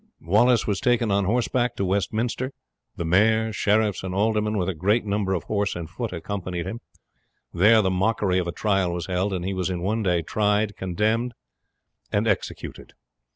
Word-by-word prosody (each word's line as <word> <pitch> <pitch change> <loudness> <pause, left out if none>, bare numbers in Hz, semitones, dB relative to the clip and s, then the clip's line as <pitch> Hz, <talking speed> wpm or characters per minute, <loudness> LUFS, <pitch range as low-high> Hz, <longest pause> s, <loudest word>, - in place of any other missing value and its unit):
He - - -22
was 110 +1 +3
taken 120 -3 +2
on 100 0 +2
horseback 120 +3 0
to 100 - -1
Westminster, 110 +7 -1 0.4
the 85 - -4
mayor, 110 +5 +3
sheriffs, 105 -1 +1
and 95 0 -4
aldermen, 105 +1 +1
with 90 -3 0
a 95 - 0
great 100 +8 +1
number 100 -2 0
of 85 - -3
horse 100 -1 -1
and 85 -2 -5
foot, 115 +6 -5
accompanying 90 0 -4
him. 110 +6 -6 0.7
There 110 +5 +5
the 95 - +1
mockery 95 -1 +1
of 90 - -2
a - - -1
trial 95 -2 0
was 85 -1 -3
held, 95 +2 -1
and 90 -2 -3
he 95 - -2
was 95 -1 -1
in 90 -2 -3
one 110 +4 0
day 90 -4 +1
tried, 105 +3 0
condemned, 110 +6 -1 0.8
and - - +1
executed. - - -3
100 Hz, 180 wpm, -24 LUFS, 90-110 Hz, 0.8 s, There